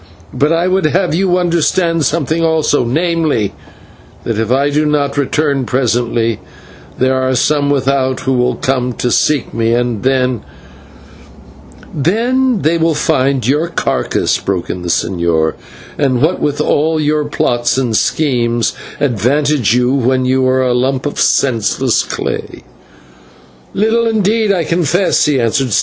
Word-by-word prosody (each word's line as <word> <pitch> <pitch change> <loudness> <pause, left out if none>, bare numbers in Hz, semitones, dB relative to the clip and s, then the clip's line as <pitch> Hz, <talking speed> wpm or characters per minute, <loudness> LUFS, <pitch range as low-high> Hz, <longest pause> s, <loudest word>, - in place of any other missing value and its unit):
"But 145 +3 +1
I 165 +2 +1
would 185 -2 +1
have 180 +2 0
you 180 +1 +1
understand 170 -1 +1
something 160 +1 -1
also; 160 -4 +1
namely, 155 - 0 0.7
that 115 -2 -2
if 110 -1 -1
I 140 +3 +2
do 150 +2 +1
not 145 -2 0
return 140 0 0
presently, 120 -3 0 0.6
there 130 +1 +1
are 130 0 0
some 145 +3 +1
without 135 -1 0
who 135 - -1
will 125 0 +1
come 125 -1 -1
to 120 +1 -2
seek 150 -4 +1
me, 115 0 +1
and 120 -3 -1
then 130 -3 0 0.8
" - - -21
"And 145 - -6
then 240 - +1
they 165 +2 +1
will 165 -1 +1
find 135 -3 0
your 150 +6 +1
carcase," - - -1
broke 95 -3 -3
in 90 - -6
the 90 - -5
señor, 85 -3 0 0.5
"and 135 -4 +1
what 160 +7 +1
will 145 -1 -1
all 155 +2 +1
your 150 0 0
plots 120 -4 0
and 125 -4 0
schemes 120 -5 0 0.3
advantage 140 0 +1
you 125 +1 +2
when 130 -1 +1
you 130 0 +1
are 130 0 +2
a 125 -1 +1
lump 130 +2 -1
of 145 - -3
senseless 115 -6 +1
clay?" - - -5 1.1
"Little 225 +3 +1
indeed, 220 0 +1
I 180 -4 +1
confess," 170 +3 +1
he 145 -3 +1
answered. 120 +1 0
140 Hz, 150 wpm, -14 LUFS, 125-160 Hz, 1.1 s, I